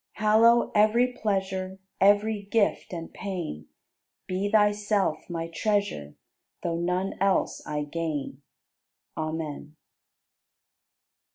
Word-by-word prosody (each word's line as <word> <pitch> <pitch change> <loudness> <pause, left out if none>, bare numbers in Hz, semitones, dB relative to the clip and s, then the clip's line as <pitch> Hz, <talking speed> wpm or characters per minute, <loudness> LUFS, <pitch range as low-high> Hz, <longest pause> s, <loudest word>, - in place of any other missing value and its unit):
Hallow 225 +3 +4
every 230 +4 +4
pleasure, 190 -4 -2 0.2
Every 205 +2 +3
gift 205 +1 0
and 165 -2 -6
pain; 170 - -5 0.6
Be 190 +2 -2
Thyself 205 -5 +1
my 165 -1 -3
Treasure. 200 - -1 0.5
Though 170 -1 -1
none 180 +2 -1
else 195 -1 +1
I 150 0 -2
gain. 145 -3 -4 0.7
Amen. 155 -1 -4
190 Hz, 90 wpm, -27 LUFS, 165-210 Hz, 0.7 s, Hallow